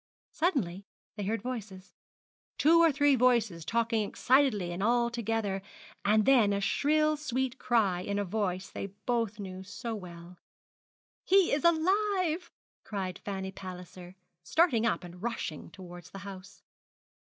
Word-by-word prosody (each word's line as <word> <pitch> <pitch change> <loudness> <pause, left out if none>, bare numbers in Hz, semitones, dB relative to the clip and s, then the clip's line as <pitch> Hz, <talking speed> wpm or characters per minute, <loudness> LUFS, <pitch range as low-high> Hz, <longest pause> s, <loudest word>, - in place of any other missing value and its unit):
Suddenly 200 - -1 0.3
they 205 -2 -4
heard 220 +1 -2
voices 210 -7 -6 0.6
two 330 +3 +5
or 330 -1 +6
three 290 0 +3
voices 230 -9 +2
talking 230 +3 0
excitedly 215 -4 +2
and 175 +2 -4
all 235 +2 +2
together 225 -4 -2 0.4
and 210 +1 +3
then 235 -7 +5
a 200 - 0
shrill 305 +9 +2
sweet 265 -3 -2
cry 220 -8 +2
in 200 +2 -3
a 205 - 0
voice 190 -1 -2
they - - -5
both 220 +2 -2
knew 190 -2 -7
so 205 +4 -6
well. 175 -3 -9 0.8
'He 385 -2 +4
is 285 - +1
alive!' 360 0 +2 0.3
cried 190 -3 -4
Fanny 190 -1 -5
Palliser, 180 -1 -10 0.3
starting 235 - +2
up 235 - -1
and 175 0 -11
rushing 230 -9 -4
towards 175 -1 -11
the - - -10
house. 195 0 -10
215 Hz, 140 wpm, -30 LUFS, 190-260 Hz, 0.8 s, or